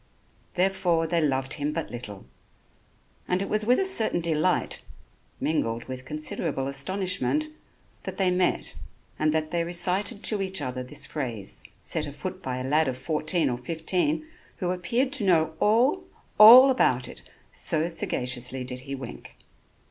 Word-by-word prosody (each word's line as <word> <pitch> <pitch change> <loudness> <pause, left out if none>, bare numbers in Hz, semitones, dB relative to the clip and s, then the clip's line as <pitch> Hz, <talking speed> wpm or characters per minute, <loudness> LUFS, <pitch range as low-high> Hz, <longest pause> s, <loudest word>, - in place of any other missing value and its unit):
Therefore, 180 -3 +1
they 165 +1 0
loved 135 -3 0
him 145 0 -2
but 165 0 -4
little; 105 - -8 1.0
and 180 - +1
it 195 - -2
was 215 0 0
with 250 - +5
a 390 - +1
certain 230 - +2
delight, 160 -2 0 0.6
mingled 115 -7 -1
with 130 0 -8
considerable 150 -1 -3
astonishment, 190 - +1 0.5
that - - -7
they 190 -2 +2
met 180 0 0 0.5
and 155 0 +2
that 155 0 -1
they 170 -1 0
recited 180 +6 -1
to 210 -3 +2
each 190 0 0
other 125 0 -4
this 125 +3 -4
phrase, 120 -10 -5 0.2
set - - -2
afoot - - -7
by 130 -1 -4
a 130 - -4
lad 150 +4 +2
of 130 -1 -3
fourteen 155 +2 +1
or 120 -2 -2
fifteen 180 - -1 0.3
who 180 -2 -2
appeared 240 +9 -1
to 275 -7 +1
know 160 -4 +2
all, 245 - +3 0.4
all 250 +5 +10
about 125 - +2
it, - - -10 0.3
so 160 +1 0
sagaciously 125 -5 -1
did 125 0 -6
he 135 +2 -6
wink. 130 -3 -10
165 Hz, 155 wpm, -26 LUFS, 130-195 Hz, 1.0 s, all